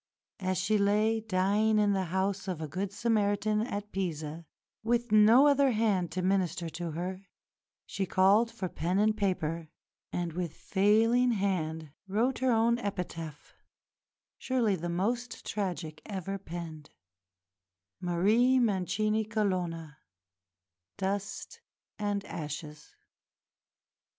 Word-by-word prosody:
As 185 -1 -1
she 215 +1 +1
lay 210 +2 +2
dying 210 +2 +2
in 205 -1 +3
the 190 -1 0
house 190 +2 -1
of 180 -4 -3
a 160 - -4
good 185 +6 -3
Samaritan 210 -1 +1
at 210 -3 -4
Pisa, 160 -3 -4 0.3
with 240 +1 0
no 215 +6 +7
other 280 -2 +4
hand 205 -6 +1
to 185 - -2
minister 180 -3 0
to 165 0 -5
her, 185 +3 -4 0.6
she 195 -2 -3
called 200 +6 +4
for 230 -5 -4
pen 175 +2 -2
and 215 +1 +3
paper, 170 -6 -1 0.4
and 175 -2 -2
with 175 -2 -4
failing 225 +5 +3
hand 160 -7 -2 0.2
wrote 225 +7 0
her 260 -1 +2
own 235 +1 +3
epitaph, 165 -7 -5 0.9
surely 240 -6 +1
the 175 0 -4
most 235 +8 -2
tragic 175 -6 -3
ever 195 -1 -4
penned 165 -4 -8 1.1
"Marie 205 +9 +3
Mancini 215 -1 +1
Colonna 180 -8 -2 1.0
Dust 200 - -4 0.4
and 205 -1 -1
Ashes." 150 -1 -7
195 Hz, 115 wpm, -30 LUFS, 175-215 Hz, 1.1 s, no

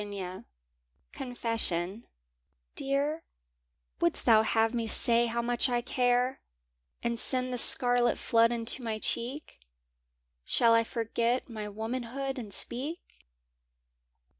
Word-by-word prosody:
Confession 230 -6 -4 0.7
EAR, 285 +4 -2 0.8
wouldst 170 - 0
thou 225 -3 +5
have 225 +1 0
me 230 -2 -2
say 235 +2 +3
how 235 +1 -3
much 240 +2 0
I 240 -1 0
care, 250 +1 0 0.6
And 235 -1 -2
send 255 0 0
the - - -3
scarlet 245 0 +6
flood 230 0 +2
into 235 +2 +1
my 225 -2 -4
cheek? 250 +7 -2 0.8
Shall 230 - +3
I 230 0 +4
forget 230 +1 -2
my 215 -2 -6
womanhood 250 +5 -5
and 215 -4 -9
speak? 270 - -3
235 Hz, 110 wpm, -28 LUFS, 230-255 Hz, 0.8 s, scarlet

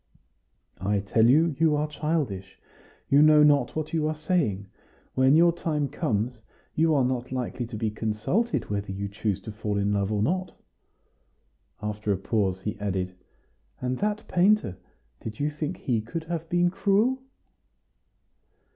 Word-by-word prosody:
"I 100 +3 0
tell 110 +3 +3
you 155 +3 +4
you 160 -2 +4
are 150 +1 0
childish; 150 - -3 0.5
you 140 +1 +5
know 155 0 +7
not 145 -4 +3
what 155 0 -3
you 155 -2 +1
are 155 - -1
saying. 150 - 0 0.5
When 130 +2 +4
your 170 +1 +6
time 150 -4 -1
comes, 120 - -2 0.3
you 160 0 +3
are 135 -3 +3
not 125 0 -2
likely 125 -1 -3
to 115 - -8
be 110 0 -1
consulted 110 - -1
whether 100 -1 -2
you 100 +1 -3
choose 100 -1 -2
to 110 - -7
fall 105 -1 -3
in 100 +1 +1
love 100 0 0
or 105 -1 +1
not." 185 +7 -1 1.3
After 105 0 -2
a 100 - +1
pause, 95 -2 -1
he 105 +1 -4
added, 95 -2 -2 0.7
"And 125 0 -2
that 210 +1 -1
painter: 185 - +3 0.4
did 110 -1 -7
you 145 +1 0
think 150 0 -4
he 120 -4 -1
could 160 +9 -5
have 165 0 -5
been 175 +1 +2
cruel?" 210 +7 +2
130 Hz, 155 wpm, -26 LUFS, 105-160 Hz, 1.3 s, know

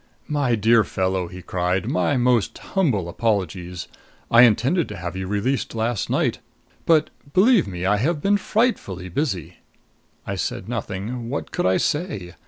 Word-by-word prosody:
"My 140 -5 +1
dear 110 +1 +4
fellow," 95 -2 -1
he 90 +1 -10
cried, 90 +2 -1
"my 140 0 +1
most 120 -3 +2
humble 130 - 0
apologies! 90 -3 -2 0.4
I 115 - +8
intended 130 - +2
to - - -7
have 90 +1 -5
you 95 0 -4
released 110 +7 -1
last 115 -1 -1
night. - - 0 0.5
But, 160 -2 +4 0.2
believe 210 - +5
me, 90 -1 -4
I 105 +2 +3
have 150 +8 0
been 200 +6 +2
frightfully 200 - -1
busy." 95 - -2 0.7
I - - -3
said 95 - -3
nothing. 115 +1 -4
What 140 - -4
could - - 0
I 95 - +3
say? 145 - -2
110 Hz, 155 wpm, -23 LUFS, 95-140 Hz, 0.7 s, I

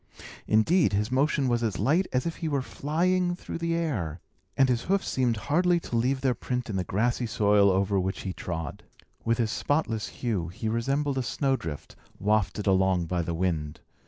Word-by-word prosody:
Indeed, 130 - +3
his 105 +4 0
motion 140 +1 +2
was 120 -1 +1
as 110 -6 -1
light 155 - +2
as 125 0 0
if 165 - -3
he 165 - -3
were 140 -3 0
flying 175 +6 0
through 175 - -7
the 170 0 0
air, 105 - -2 0.4
and 135 -1 +5
his 125 -2 0
hoofs 195 +1 +1
seemed 125 -4 +1
hardly 175 - +2
to 120 - -5
leave 130 +3 +1
their 130 -2 +2
print 125 -1 -3
in - - -3
the 95 - 0
grassy 120 +6 0
soil 105 -2 +4
over 95 +1 +2
which 95 +1 -2
he 95 - -4
trod. 80 -6 -5 0.4
With 115 0 +1
his 115 -2 0
spotless 115 -8 0
hue, 105 -9 -2
he 95 +6 -5
resembled 135 +5 0
a - - +1
snowdrift, 125 - -2 0.2
wafted 105 -1 0
along 95 -2 +3
by 90 +1 -1
the 85 0 -3
wind. 80 -4 -2
115 Hz, 190 wpm, -27 LUFS, 95-140 Hz, 0.4 s, and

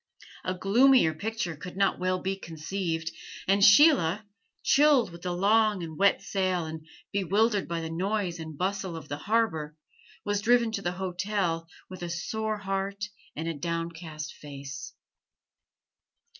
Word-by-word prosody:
A 185 - -2
gloomier 225 -1 +5
picture 205 -1 -3
could 180 +5 -9
not 195 -1 +2
well 185 0 +1
be 190 +1 -2
conceived; 165 -1 -4 0.4
and 195 +1 +3
Sheila, 210 - +6 0.4
chilled 280 - +4
with 170 0 -11
the 180 - -3
long 205 +1 +3
and 160 -1 -6
wet 200 +2 +3
sail 185 -3 0
and 160 0 -7 0.2
bewildered 200 +2 +1
by 170 -1 -2
the 160 0 -5
noise 185 0 -1
and 160 -2 -7
bustle 190 -1 -2
of 155 -2 -9
the 145 - -3
harbor, 160 -8 0 0.5
was 205 0 0
driven 235 0 +3
to 205 - -3
the 175 -1 -2
hotel 180 -2 -2 0.2
with 185 -1 -10
a 175 - -4
sore 215 +5 -2
heart 200 +1 -3 0.3
and 160 +2 -4
a 165 - -1
downcast 165 -1 -4
face. 140 -2 -8
185 Hz, 145 wpm, -28 LUFS, 165-205 Hz, 0.5 s, Sheila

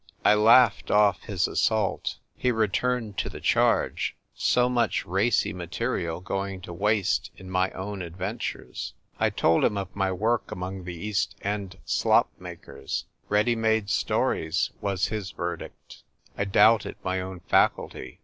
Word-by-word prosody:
I - - +7
laughed 115 +3 +5
off 105 -3 +4
his 95 -3 0
assault. 110 -4 0 0.2
He 125 - 0
re 110 -3 +2
turned 120 -2 -1
to - - -1
the - - -9
charge; - - +1 0.2
so 125 0 +2
much 120 -3 0
racy 95 +6 +1
material 90 -2 -3
going 95 0 -3
to 85 - -8
waste 105 +1 +1
in 95 0 -10
my 95 0 +2
own 100 +1 -5
adventures. 95 +6 -5 0.2
I - - +3
told 80 - +2
him 105 - +2
of 95 -2 -5
my 95 -1 0
work 110 +6 0
among 90 0 -5
the 90 -1 -5
East 100 +4 -2
End 100 -2 -3
slop - - +3
makers! 65 - -6
" - - -39
Ready 105 +4 +3
made 110 -2 +1
stories," 80 -1 0
was 100 -1 0
his 105 -3 -3
verdict. - - -7 0.3
I 100 - -1
doubted 105 +2 +4
my 95 0 -1
own 95 -1 -7
faculty. 65 -6 0
100 Hz, 150 wpm, -26 LUFS, 95-110 Hz, 0.3 s, I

